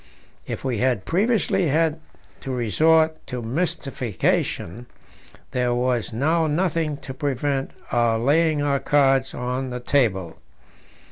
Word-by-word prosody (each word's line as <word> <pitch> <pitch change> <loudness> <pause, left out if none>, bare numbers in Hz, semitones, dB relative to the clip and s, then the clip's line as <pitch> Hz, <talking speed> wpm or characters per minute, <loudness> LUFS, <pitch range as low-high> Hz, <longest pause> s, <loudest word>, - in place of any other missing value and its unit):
If - - -5
we 125 -5 -1
had 125 -6 +1
previously 200 -1 +1
had 160 +2 +1 0.4
to 135 - -6
resort 155 - +3
to 125 - -4
mystification, 125 - -2 0.6
there 125 -1 0
was 125 -2 0
now 160 +8 +1
nothing 160 -2 0
to 135 - -8
prevent 135 0 -1 0.2
our 120 -1 +2
laying 150 +5 +2
our 140 -1 +1
cards 135 -2 +2
on 125 +1 -3
the 125 0 -4
table. 110 - 0
135 Hz, 120 wpm, -23 LUFS, 125-155 Hz, 0.6 s, resort